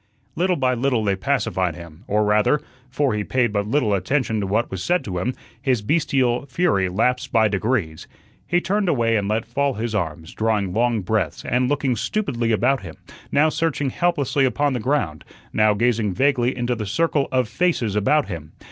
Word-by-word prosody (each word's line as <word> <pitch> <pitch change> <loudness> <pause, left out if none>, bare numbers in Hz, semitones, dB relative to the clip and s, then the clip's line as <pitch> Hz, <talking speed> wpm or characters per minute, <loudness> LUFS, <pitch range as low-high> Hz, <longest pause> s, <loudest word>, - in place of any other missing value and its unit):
Little 180 +2 +1
by 130 -4 +1
little 125 -2 0
they 100 -2 +1
pacified 95 - -1
him, 85 +4 -12
or 105 +1 +2
rather 105 +8 +3 0.3
(for 135 0 0
he 105 -1 -1
paid 120 -1 0
but 100 0 -1
little 115 -3 +1
attention 115 +2 0
to 100 - -2
what 110 +5 0
was 95 -2 -4
said 175 - +1
to 90 -3 -4
him) 125 +8 -2 0.3
his 125 -6 0
bestial 135 -2 +1
fury 130 - +1
lapsed 125 +7 0
by 110 -2 +4
degrees. 100 -6 -1 0.4
He 175 0 +2
turned 200 +1 0
away 115 -6 +2
and 100 -2 0
let 110 +2 0
fall 140 -2 -1
his 115 +1 -3
arms, 80 -5 -3
drawing 105 -4 0
long 115 0 +1
breaths, 110 +3 -2
and 125 +1 +1
looking 140 -3 0
stupidly 120 - -1
about 125 +4 +2
him, 80 -5 -9 0.4
now 150 +3 +4
searching 155 -4 -1
helplessly 150 -5 +1
upon 135 +2 +1
the 125 - -1
ground, 115 - -1 0.3
now 110 -1 +3
gazing 110 -4 +1
vaguely 130 -2 +1
into 120 0 0
the 110 -3 -4
circle 150 +4 +1
of 130 -2 +1
faces 120 - 0
about 140 +9 +2
him. 80 -5 -7
120 Hz, 185 wpm, -22 LUFS, 105-140 Hz, 0.4 s, by